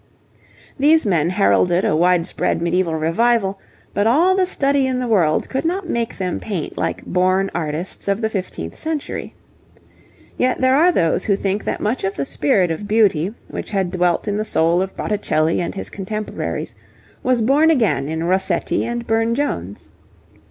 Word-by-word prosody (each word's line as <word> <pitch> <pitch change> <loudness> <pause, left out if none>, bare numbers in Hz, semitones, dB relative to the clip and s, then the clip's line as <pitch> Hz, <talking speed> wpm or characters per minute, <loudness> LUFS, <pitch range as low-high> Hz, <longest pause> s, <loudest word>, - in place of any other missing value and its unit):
These 310 +2 +4
men 170 -5 +2
heralded 100 - +2
a - - +2
widespread 175 0 +1
medieval 170 0 0
revival, 195 +5 +1 0.3
but 205 +2 +1
all 335 +10 +4
the 375 -1 +2
study 280 -5 +2
in 255 -1 -1
the 250 - -2
world 180 -10 +2
could 265 - -2
not 355 +3 -2
make 235 -6 -2
them 185 -2 -2
paint 190 -8 -4
like - - -3
born 185 +2 +1
artists 165 +3 -3
of 200 +1 +1
the 220 - 0
fifteenth 185 - -5
century. 315 -2 -4 1.0
Yet 255 0 +1
there 260 0 +3
are 335 +5 +5
those 170 - +1
who 200 - +2
think 200 +1 -2
that - - -2
much 225 +5 -1
of 195 +1 -1
the 140 - -2
spirit 170 +6 +1
of 185 +6 -4
beauty, 205 -5 +2 0.2
which - - -6
had 190 -4 -1
dwelt 180 +1 0
in 205 0 -1
the 215 - -1
soul 170 -4 +2
of 190 0 -4
Botticelli 165 -6 0
and 175 - -4
his - - -6
contemporaries, 210 +2 -4 0.5
was 255 -1 +1
born 280 +8 +4
again 220 - +1
in 160 +1 -2
Rossetti 190 +2 0
and 235 0 -3
Burne 225 +1 +1
Jones. 100 - -4
195 Hz, 170 wpm, -20 LUFS, 175-240 Hz, 1.0 s, are